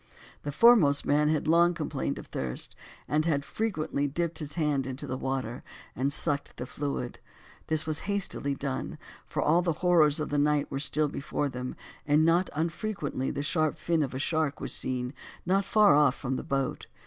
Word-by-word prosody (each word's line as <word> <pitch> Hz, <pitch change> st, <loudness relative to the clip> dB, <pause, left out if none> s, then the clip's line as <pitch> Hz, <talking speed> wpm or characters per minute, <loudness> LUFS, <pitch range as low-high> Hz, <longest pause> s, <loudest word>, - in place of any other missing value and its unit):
The 145 Hz, -, -4 dB
foremost 170 Hz, -6 st, +5 dB
man 150 Hz, +1 st, +3 dB
had 155 Hz, 0 st, 0 dB
long 170 Hz, +2 st, +5 dB
complained 70 Hz, -, -2 dB
of -, -, -8 dB
thirst, 65 Hz, -1 st, -4 dB, 0.3 s
and 150 Hz, +1 st, +2 dB
had 140 Hz, -3 st, +1 dB
frequently 155 Hz, -10 st, -1 dB
dipped 170 Hz, +3 st, -2 dB
his 150 Hz, -2 st, -5 dB
hand 145 Hz, -5 st, 0 dB
into 135 Hz, +2 st, -5 dB
the 130 Hz, -, -3 dB
water, 130 Hz, -3 st, -3 dB, 0.3 s
and 135 Hz, +3 st, 0 dB
sucked 145 Hz, -1 st, -1 dB
the 125 Hz, -, -4 dB
fluid; 140 Hz, -2 st, -4 dB, 0.5 s
this 155 Hz, -1 st, 0 dB
was 155 Hz, -1 st, -2 dB
hastily 190 Hz, -8 st, -1 dB
done, 135 Hz, -1 st, -4 dB, 0.3 s
for -, -, -1 dB
all 165 Hz, +4 st, +4 dB
the 170 Hz, -2 st, 0 dB
horrors 155 Hz, -4 st, +5 dB
of 150 Hz, -, -2 dB
the 145 Hz, -, +1 dB
night 150 Hz, 0 st, +2 dB
were 135 Hz, -, -2 dB
still 150 Hz, +1 st, +1 dB
before 145 Hz, 0 st, -2 dB
them, 125 Hz, 0 st, -5 dB, 0.3 s
and 150 Hz, +2 st, +4 dB
not 170 Hz, +3 st, +3 dB
unfrequently 160 Hz, -4 st, -2 dB
the 140 Hz, -, -3 dB
sharp 155 Hz, 0 st, 0 dB
fin 165 Hz, -2 st, 0 dB
of 135 Hz, -3 st, -2 dB
a -, -, -1 dB
shark 155 Hz, 0 st, 0 dB
was -, -, -3 dB
seen 125 Hz, 0 st, -2 dB, 0.3 s
not 195 Hz, +3 st, +2 dB
very -, -, -14 dB
far 150 Hz, -10 st, +6 dB
from 130 Hz, 0 st, -3 dB
the -, -, -3 dB
boat. 135 Hz, -2 st, -2 dB
150 Hz, 185 wpm, -28 LUFS, 135-165 Hz, 0.5 s, far